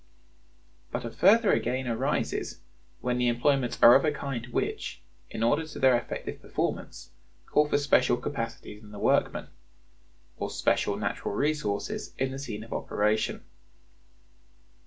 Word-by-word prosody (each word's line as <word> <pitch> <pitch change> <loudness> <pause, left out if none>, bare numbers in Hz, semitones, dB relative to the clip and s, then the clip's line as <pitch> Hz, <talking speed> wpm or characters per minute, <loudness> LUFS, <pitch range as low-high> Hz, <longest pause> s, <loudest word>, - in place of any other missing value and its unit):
But - - -3
a 115 - -4
further 215 - +5
gain 130 0 -2
arises 115 -2 -1 0.4
when 125 0 0
the 125 - +2
employments 125 +1 +1
are 120 - +11
of 135 - +6
a 155 - +2
kind 135 -5 -4
which, 125 - -3 0.3
in 110 - -3
order 145 +7 +3
to 155 - -9
their 130 -2 +5
effective 120 - -4
performance, - - -4 0.3
call 150 0 +3
for - - +3
special 130 -4 +3
capacities 115 -5 -5
in 105 - -14
the 105 - -10
workman, - - +1 0.9
or - - -2
special - - +1
natural - - -3
resources 140 -6 -2
in 130 0 -1
the 135 - -5
scene 110 -6 -5
of 115 - -8
operation. 105 +1 0
125 Hz, 140 wpm, -28 LUFS, 115-140 Hz, 0.9 s, are